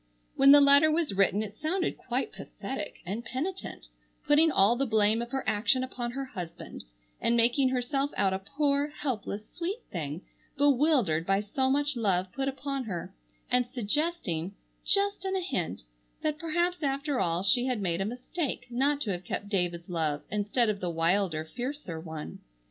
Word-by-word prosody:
When 275 0 +7
the 290 0 +9
letter 285 +2 +7
was 310 -5 +1
written 195 +2 +2
it 210 0 -9
sounded 360 +4 0
quite - - -3
pathetic - - -6
and 205 +6 -4
penitent, 265 - -5 0.4
putting 310 +2 +5
all 205 -1 +4
the 270 +2 0
blame 220 0 +3
of 235 - -5
her 270 0 -2
action 235 +5 +2
upon 245 -2 -4
her 275 +1 -3
husband, 175 -9 -8 0.4
and 235 - +2
making 245 +3 +3
herself 265 +2 0
out 195 -2 +2
a 190 - -1
poor, 280 +7 0
helpless, 235 -8 -4
sweet 375 +7 -4
thing, 155 0 -4 0.3
bewildered 275 - +3
by 195 0 +3
so 260 +6 0
much 290 +1 +1
love 190 -5 0
put 270 +5 -2
upon 275 -1 -3
her, 180 -6 -5 0.4
and 250 -1 +3
suggesting, 240 - -1 0.3
just 400 0 +2
in 385 0 -1
a - - +1
hint, 265 - -3 0.4
that 305 0 0
perhaps 345 +2 0
after 280 -1 -1
all 170 -2 0
she 245 +5 +4
had 250 -4 0
made 180 -2 -1
a - - 0
mistake 250 - -3
not 280 +4 +1
to 215 - -1
have 180 -1 -4
kept 200 +2 -4
David's 175 -4 -1
love 160 -4 -1
instead 210 +3 +1
of 210 -2 -1
the 180 - -2
wilder, 165 -1 +1
fiercer 245 - -5
one. 160 - -7
245 Hz, 170 wpm, -29 LUFS, 195-285 Hz, 0.4 s, the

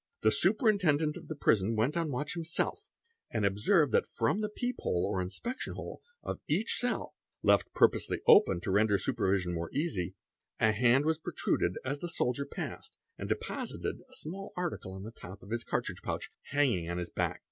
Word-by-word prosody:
The - - +4
Superintendent 165 - +3
of 170 -3 -9
the 155 - -4
Prison 110 -5 +2
went 120 +8 +1
on 165 -2 0
watch 145 +2 -2
himself 170 - -2 0.4
and 110 -3 0
observed 125 - +3
that - - +3
from 120 - 0
the 210 - -1
peephole, 235 - -1
or 95 -2 -1
inspection 230 - -4
hole, - - -7 0.2
of - - -4
each 190 +10 +1
cell, 245 -1 -1 0.3
left - - +4
purposely - - +3
open 85 - +6
to 95 - -2
render 105 +1 +4
supervision 95 -2 0
more 85 0 -3
easy, 140 - -2 0.4
a 110 - +5
hand 125 +5 +4
was 160 0 +1
protruded 90 - 0
as 140 +2 -2
the 175 - -4
soldier 140 -3 -1
passed - - -6 0.2
and - - -4
deposited - - -3
a - - -13
small 195 +6 -6
article 170 - -3
on 95 0 -7
the 110 - -7
top 95 -4 -11
of 100 - -12
his 115 0 -1
cartridge - - -2
pouch, - - -4
hanging 125 -13 +1
on 85 - -2
his 90 -1 -4
back. - - -1
135 Hz, 180 wpm, -31 LUFS, 100-170 Hz, 0.4 s, open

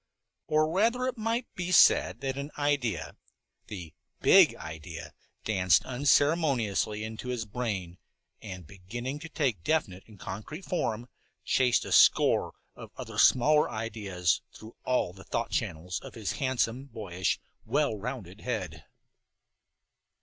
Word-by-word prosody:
Or 155 0 +3
rather 225 +9 +1
it 255 -1 -1
might 230 +2 -1
be 180 0 -4
said 185 - +5
that 135 -1 -2
an 140 +1 -5
idea, 140 - -1 0.5
the 90 -7 -8 0.3
big - - +6
idea, 80 +1 -8 0.3
danced 95 -6 +3
unceremoniously 130 - +2
into 110 +3 -6
his 125 -3 -2
brain, 100 -6 -4 0.4
and, 95 -5 -8
beginning 120 - -6
to 165 +2 -9
take 130 - -1
definite 100 - 0
and 105 -4 -16
concrete 110 - -7
form, 120 -9 -2 0.4
chased 125 -2 +2
a - - -7
score - - +5 0.2
of - - -10
other - - -6
smaller 150 +4 +5
ideas 105 -6 -1
through 110 +1 -13
all 125 -8 +1
the 95 0 -13
thought - - -3
channels 85 +3 -2
of - - -11
his 110 -4 -3
handsome, 130 -1 -1
boyish, 95 -8 -2 0.2
well 145 -7 +1
rounded 105 -3 -6
head. 90 - -4
115 Hz, 130 wpm, -29 LUFS, 95-145 Hz, 0.5 s, big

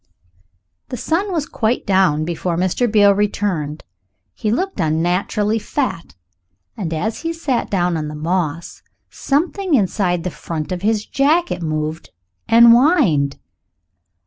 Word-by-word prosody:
The 250 - -5
sun 360 - -1
was 320 -5 -1
quite 225 -2 -1
down 185 -6 +2
before 170 0 -2
Mr. 185 +6 0
Beale 205 -2 +5
returned. 195 -7 -2 0.5
He 215 - -3
looked 370 - -2
unnaturally 180 +7 0
fat, 245 - -3 0.6
and 170 -5 -4
as 215 +8 -2
he 330 - -3
sat 305 -7 -2
down 180 -3 0
on 155 -1 -3
the 150 - -7
moss 165 0 -3 0.3
something 340 +4 0
inside 185 -5 0
the 180 - -3
front 160 -1 -6
of 180 -1 -3
his 215 +1 0
jacket 305 - +1
moved 155 0 -3 0.4
and 235 +1 +7
whined. 235 - +4
200 Hz, 130 wpm, -19 LUFS, 165-245 Hz, 0.6 s, and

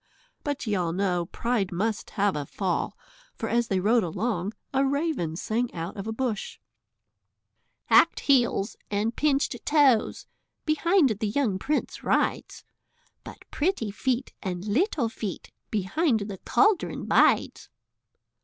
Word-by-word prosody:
But 285 -3 -3
ye 215 - -1
all 175 -4 0
know, 180 -2 0
pride 230 -4 -1
must 210 +5 -2
have 200 -2 +2
a 145 -2 -4
fall, 185 -3 -2 0.4
for - - -4
as 235 0 +1
they 190 - 0
rode 225 +5 +3
along 190 +3 -2 0.2
a 270 0 +3
raven 275 - -1
sang 230 +7 -1
out 165 +2 -5
of 200 0 -6
a - - -2
bush 225 -3 -3 1.3
"Hackèd - - +5
Heels 240 -6 +2
and 210 +3 -1
Pinchèd 285 -2 0
Toes 280 -7 +3 0.4
Behind 335 0 +3
the 215 +1 -2
young 215 -5 0
prince 300 +8 -2
rides, - - 0 0.6
But - - -11
Pretty 290 - -1
Feet 255 +4 -2
and 180 -1 -4
Little 265 - +1
Feet 215 -4 -6 0.2
Behind 220 - +1
the 200 -2 -6
cauldron 410 -2 +1
bides." - - +2
220 Hz, 135 wpm, -26 LUFS, 195-275 Hz, 1.3 s, Hackèd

